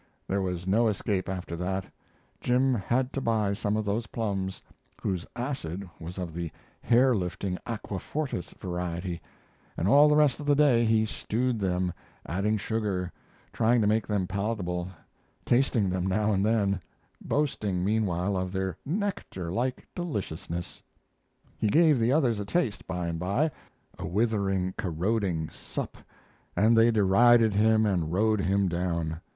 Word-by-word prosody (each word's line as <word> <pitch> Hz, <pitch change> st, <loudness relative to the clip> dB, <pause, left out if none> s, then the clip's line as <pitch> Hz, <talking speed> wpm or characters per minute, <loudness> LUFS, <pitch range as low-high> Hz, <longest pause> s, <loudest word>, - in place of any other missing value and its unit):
There 100 Hz, +1 st, 0 dB
was 90 Hz, -2 st, -3 dB
no 110 Hz, +5 st, +3 dB
escape 100 Hz, -2 st, -1 dB
after 90 Hz, -3 st, -4 dB
that; 95 Hz, +2 st, -2 dB, 0.5 s
Jim 130 Hz, +2 st, +2 dB
had 125 Hz, +4 st, 0 dB
to 135 Hz, -, -2 dB
buy 110 Hz, -4 st, +1 dB
some 105 Hz, +1 st, -1 dB
of 110 Hz, -, -1 dB
those 105 Hz, +3 st, -1 dB
plums, 95 Hz, -4 st, -3 dB, 0.4 s
whose 95 Hz, -3 st, -2 dB
acid 100 Hz, -, -4 dB
was 85 Hz, +3 st, -7 dB
of 90 Hz, -3 st, -4 dB
the 85 Hz, 0 st, -3 dB, 0.3 s
hair 125 Hz, +2 st, +4 dB
lifting 90 Hz, 0 st, -2 dB
aqua 105 Hz, -4 st, -4 dB
fortis 145 Hz, -, -3 dB
variety, 90 Hz, -1 st, -3 dB, 0.6 s
and 90 Hz, -, 0 dB
all 145 Hz, +7 st, +7 dB
the 150 Hz, -, +4 dB
rest 150 Hz, -4 st, +4 dB
of 145 Hz, -, -6 dB
the 145 Hz, -, +5 dB
day 135 Hz, -5 st, +4 dB
he 110 Hz, -1 st, +3 dB
stewed 120 Hz, +2 st, -1 dB
them, 90 Hz, -2 st, 0 dB, 0.3 s
adding 100 Hz, +7 st, 0 dB
sugar, 100 Hz, -4 st, -2 dB, 0.4 s
trying 120 Hz, +2 st, +3 dB
to -, -, +2 dB
make 110 Hz, +1 st, +2 dB
them 100 Hz, -3 st, 0 dB
palatable, 95 Hz, -2 st, -2 dB, 0.6 s
tasting 120 Hz, -4 st, +3 dB
them 90 Hz, 0 st, -1 dB
now 105 Hz, +3 st, +1 dB
and 95 Hz, 0 st, +1 dB
then, 100 Hz, -3 st, +1 dB, 0.4 s
boasting 105 Hz, -11 st, 0 dB
meanwhile 100 Hz, -3 st, +1 dB
of 95 Hz, 0 st, -2 dB
their 95 Hz, -2 st, -2 dB
nectar 185 Hz, -, -3 dB
like 125 Hz, +6 st, -2 dB
deliciousness. 90 Hz, -, -4 dB, 0.8 s
He 110 Hz, -, +1 dB
gave 155 Hz, +3 st, +5 dB
the 115 Hz, +2 st, +2 dB
others 130 Hz, -7 st, +2 dB
a 100 Hz, -, -3 dB
taste 120 Hz, -, -1 dB
by 90 Hz, -1 st, -2 dB
and 85 Hz, -1 st, -3 dB
by 100 Hz, -, +1 dB, 0.5 s
a -, -, -4 dB
withering, 95 Hz, -2 st, 0 dB
corroding 90 Hz, -2 st, -1 dB
sup -, -, -5 dB, 0.6 s
and 110 Hz, +3 st, +4 dB
they 115 Hz, +1 st, +6 dB
derided 110 Hz, +2 st, +5 dB
him 110 Hz, +2 st, +4 dB
and 85 Hz, -6 st, 0 dB
rode 105 Hz, +3 st, +2 dB
him 100 Hz, 0 st, +2 dB
down. 85 Hz, -2 st, -2 dB
100 Hz, 150 wpm, -28 LUFS, 90-115 Hz, 0.8 s, all